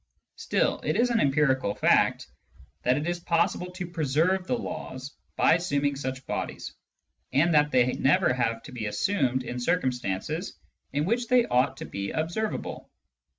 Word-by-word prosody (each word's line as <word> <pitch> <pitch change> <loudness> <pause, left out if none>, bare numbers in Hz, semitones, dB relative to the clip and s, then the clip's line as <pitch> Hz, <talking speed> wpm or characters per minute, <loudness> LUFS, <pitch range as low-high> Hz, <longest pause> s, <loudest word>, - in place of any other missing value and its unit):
Still, - - 0
it - - 0
is 245 +1 +2
an 230 - +2
empirical 135 - +2
fact - - +3 0.6
that 125 +1 +2
it 150 +3 -2
is 175 0 -1
possible 170 +1 0
to 185 0 -5
preserve 170 +3 0
the 250 - 0
laws 135 - -6 0.2
by - - +4
assuming 145 -4 0
such 130 -1 -5
bodies, - - -4 0.6
and 165 +5 +3
that 150 -1 +4
they 125 -2 +3
never 135 -1 +3
have 115 -2 -1
to - - -11
be 110 -4 -4
assumed 130 - 0
in 125 0 -5
cir 170 +9 +2
cumstances 130 - -3 0.4
in 145 +2 0
which 235 +5 0
they 250 -1 +4
ought 125 +2 +1
to - - -6
be 100 0 -4
observable. 170 +7 -3
145 Hz, 160 wpm, -27 LUFS, 130-175 Hz, 0.6 s, by